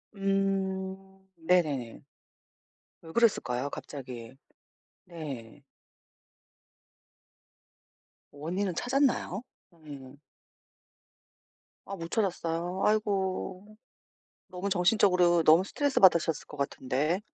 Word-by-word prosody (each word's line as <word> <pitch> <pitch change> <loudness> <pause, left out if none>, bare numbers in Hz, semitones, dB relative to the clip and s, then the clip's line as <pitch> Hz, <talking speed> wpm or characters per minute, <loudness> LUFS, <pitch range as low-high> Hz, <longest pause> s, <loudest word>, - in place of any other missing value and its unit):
음 195 -1 -1 0.4
네네네. 155 -8 0 1.0
왜 160 - -11
그랬을까요 145 - +1
갑자기? 130 -5 -8 0.7
네. 145 -7 -8 2.7
원인은 175 +6 -3
찾았나요? 250 -4 0 0.3
네. 145 -5 -12 1.7
아 195 - -6
못 165 -2 -7
찾았어요? 180 -3 -1
아이고. 200 -1 -1 0.7
너무 185 +2 -4
정신적으로 180 -2 +4
너무 160 +4 +6
스트레스받으셨을 190 - +3
것 150 - -11
같은데. 140 +4 -1
175 Hz, 180 characters per minute, -29 LUFS, 150-195 Hz, 2.7 s, 너무